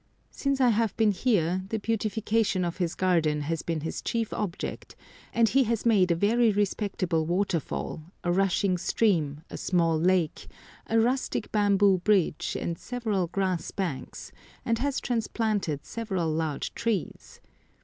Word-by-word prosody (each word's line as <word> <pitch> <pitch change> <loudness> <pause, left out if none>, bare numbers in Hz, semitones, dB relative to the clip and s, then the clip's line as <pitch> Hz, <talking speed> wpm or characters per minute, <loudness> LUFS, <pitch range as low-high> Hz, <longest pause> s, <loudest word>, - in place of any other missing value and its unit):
Since 275 -1 -1
I 255 -2 +5
have 225 -2 +1
been 220 -2 +4
here 185 -4 +1
the 225 - -1
beautification 215 -2 0
of 170 - -3
his 175 -3 -1
garden 165 -5 +2
has 160 +2 -2
been 165 -2 -3
his 160 - -4
chief 230 -2 -2
object, 200 -3 -4 0.4
and 230 -1 +3
he 270 -1 +3
has 230 0 -1
made 200 -6 +4
a 170 - +3
very 220 +5 +3
respectable 195 -4 0
waterfall, 175 -3 -1 0.2
a 175 - +1
rushing 190 0 +2
stream, 160 -8 +1
a - - -5
small 165 -3 +1
lake, 175 -2 +1 0.4
a 225 - +2
rustic 250 +4 0
bamboo 200 -2 +4
bridge, 185 -5 +1
and 170 -1 -3
several 220 -7 -2
grass 185 -1 -1
banks, 175 -9 -5 0.3
and 230 -1 +1
has 280 +1 0
transplanted 215 - -1
several 190 -8 -2
large 155 -2 -2
trees. 230 -7 -3
195 Hz, 145 wpm, -27 LUFS, 170-225 Hz, 0.4 s, I